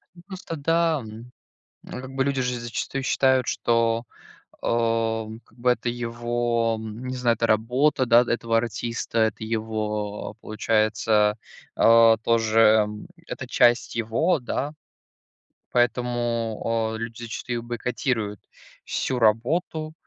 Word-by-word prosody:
Ну 175 - -15
просто 185 -4 -7
да, 165 +1 +1
мгм, 115 +1 -10 0.6
э, - - -12
как 130 0 -9
бы 135 0 +1
люди 140 -1 0
же 125 0 -2
зачастую 120 +3 -4
считают, 130 -1 +2
что, 115 0 +1 0.6
а, 115 -1 0
м, 110 +1 -9
как - - -26
бы 125 +1 +2
это 120 - -4
его, 120 -1 -1
м, 110 +2 -7
не 130 - -4
знаю, 120 -2 +2
это 115 - +1
работа, 125 +5 +2
да, 120 0 +6
этого 115 -1 0
артиста, 115 0 -2
это 110 0 +1
его, 110 -2 -3
а, - - -13
получается, 110 -1 +1 0.4
э, 115 0 +6
тоже, 115 -1 +2
м, 105 -1 +3 0.2
это - - -6
часть 120 0 +3
его, 115 +10 +1
да. 140 +3 -3 1.0
Поэтому, 115 -2 0
э, - - -4
люди 115 +1 -6
зачастую 120 +1 -4
их - - -9
бойкотируют, 120 -3 -2 0.5
всю 130 -2 -2
работу, 155 +8 +1
115 Hz, 135 wpm, -24 LUFS, 110-125 Hz, 1.0 s, да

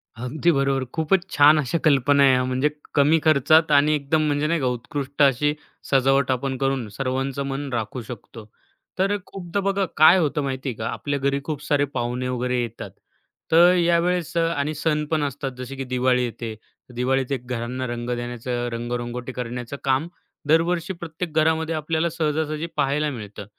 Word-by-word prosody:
अगदी 130 +9 0
बरोबर. 135 -2 +1
खूपच 170 +3 +1
छान 150 +2 +6
अशा 145 +2 -1
कल्पना 140 -1 +4
आहे, 130 -2 +5
म्हणजे 130 +3 +1 0.3
कमी 150 +3 +4
खर्चात 155 +1 +4
आणि 145 +1 +5
एकदम 150 +2 0
म्हणजे 145 0 0
नाही 165 +1 +1
का 135 - -1
उत्कृष्ट 135 +3 -4
अशी 140 +2 +3 0.4
सजावट 135 0 +3
आपण 130 +1 -2
करून 135 -3 -1
सर्वांचं 135 +4 -2
मन 140 +1 -4
राखू 115 +2 -3
शकतो. 115 -1 -10 0.5
तर 195 +2 +2
खूपदा 185 0 -4
बघा 195 0 0
काय 155 +4 +8
होतं 150 -4 0
माहिती 135 0 -3
आहे 120 - -4
का, 110 - -3
आपल्या 140 +3 -3
घरी 140 +1 0
खूप 150 -2 -4
सारे 145 -1 +2
पाहुणे 125 +1 -2
वगैरे 125 0 -1
येतात, 120 - -6 0.6
तर 170 +2 +7
यावेळेस 175 0 +1
अ, - - +4 0.2
आणि 145 +2 -1
सण 150 0 0
पण 155 -2 +1
असतात, 140 -1 -3
जसे 130 +1 -7
की 135 - -4
दिवाळी 125 0 +1
येते. 115 -1 -6 0.4
दिवाळीत 130 +2 0
एक 125 -2 -3
घरांना 125 +1 -3
रंग 120 0 -4
देण्याचं, 120 0 -4
रंग-रंगोटी 120 +1 -4
करण्याचं 125 +2 -5
काम 135 +4 +1 0.4
दरवर्षी 170 +3 +2
प्रत्येक 170 -1 -6
घरामध्ये 160 +1 +2
आपल्याला 160 +2 -1
सहजासहजी 155 -1 -2
पाहायला 150 +2 +1
मिळतं. 105 -5 -8
140 Hz, 165 wpm, -23 LUFS, 125-155 Hz, 0.6 s, काय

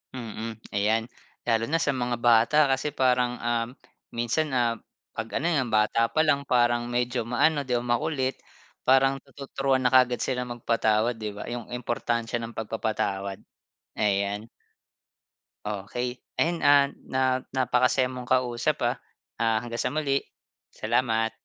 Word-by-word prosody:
Mm, 115 -2 -5 0.2
ay 100 +1 0 0.6
lalo 115 -1 +1
na 165 +2 +1
sa 145 - +2
mga 120 -1 -1
bata 120 +4 +4
kasi 140 +3 0
parang 125 -1 +2
um, 115 -1 0 0.5
minsan 120 +7 0
ah, 120 -1 +2 0.4
pag 115 0 -3
ano 165 - -1
nga 140 -5 +2
bata 110 +1 +2
pa - - 0
lang 140 -2 +2
parang 120 -1 +2
medyo 120 0 -1
maano 145 +4 +2
di 125 - +1
o 120 - 0
makulit, 130 +2 -1 0.5
parang 135 +1 +4 0.2
tuturuan 135 -1 -1
na 125 - +3
kaagad 125 -1 +4
sila 125 -1 -2
magpatawad, 115 -1 +1
di 105 -1 -4
ba? 105 - -6
Yung 120 -2 -5
importansya 120 -1 -2
ng 115 0 -7
pagpapatawad 100 -3 -2 0.6
Ayan. 100 +1 0 1.2
Okey, 115 +5 -4 0.2
ayun 170 0 +1
ah, 145 -1 +6 0.2
na 130 0 0 0.3
napakasaya 125 0 +2
mong 125 -1 -7
kausap 125 -2 +1
ah. - - +1 0.5
Ah, 115 -1 +3
hanggang 115 -1 -4
sa - - 0
muli. 140 -3 +1 0.5
Salamat. 115 -1 0
120 Hz, 140 wpm, -26 LUFS, 115-130 Hz, 1.2 s, ah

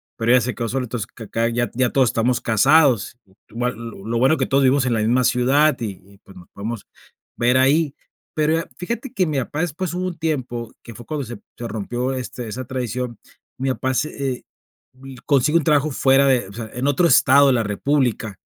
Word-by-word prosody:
pero 115 0 0
ella 125 0 +6
se 125 +2 -2
quedó 115 -2 -4
sola. 130 +2 -1
Entonces 115 -4 -4
acá, 115 0 -2
ya 120 -1 -1
ya 125 0 +1
todos 130 -3 +3
estamos 120 +3 +1
casados, 130 - +3 0.3
igual 120 +2 -2
lo 115 -4 -9
lo 115 +1 -1
bueno 135 +6 +4
que 130 - 0
todos 135 +1 +2
vivimos 135 0 +3
en 125 - +1
la 110 - 0
misma 120 +4 +2
ciudad, 135 +5 +3
y 110 -3 -3
y 100 0 -19
pues 95 - -16
nos 90 -1 -14
podemos 110 +1 -6 0.5
ver 120 +2 +3
ahí. 140 +3 +3 0.4
Pero 160 +1 +1
fíjate 235 +8 -4
que 190 -5 +1
mi 155 -4 -2
papá 145 +4 -3
después, 175 +1 -3
hubo 180 +1 -2
un 175 -2 -6
tiempo 130 -8 -3
que 115 - -10
fue 120 +2 -12
cuando 150 0 -4
se 120 -2 -8 0.2
se 120 - -5
rompió, 120 +5 -3
este 125 -2 -6
esa 125 +4 -5
tradición, 125 -2 -4 0.4
mi 135 +1 -1
papá 130 +1 -2
se, 140 -1 -2
eh, - - -15 0.5
vi 130 0 -12
consigue 145 +3 +3
un 165 - 0
trabajo 150 0 +2
fuera 135 +1 +4
de 125 -5 +2
o 100 - -12
sea, 110 +1 -7
en 125 +3 -2
otro 145 +5 +3
estado 140 -1 +6
de 135 - +4
la 115 -2 +1
república. 110 - -1
130 Hz, 215 wpm, -21 LUFS, 115-140 Hz, 0.5 s, ella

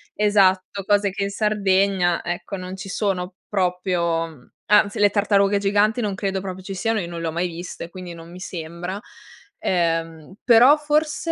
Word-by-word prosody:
esatto, 200 -2 +2
cose 205 -1 +2
che 200 +1 -3
in 200 - -1
Sardegna 195 -4 +1
ecco 175 +3 -4
non 185 0 -7
ci 195 0 -8
sono 185 -2 -2
proprio, 180 -3 0
mhmm, 150 -6 -17 0.2
anzi 210 0 +4
le 205 - +5
tartarughe 200 0 +2
giganti 205 +3 +2
non 205 -3 -2
credo 195 -1 -2
proprio 190 -1 -7
ci 195 +1 -6
siano, 220 +4 0
io 170 - -4
non 170 -1 -6
le 165 - -2
ho 160 - -2
mai 175 +2 -1
viste, 170 0 -7
quindi 180 -1 -8
non 165 0 -12
mi 180 - -10
sembra. 175 +2 -6 0.6
Ehm, 165 -1 -1
però 250 +5 +7
forse 300 +2 0
190 Hz, 175 wpm, -22 LUFS, 175-205 Hz, 0.6 s, però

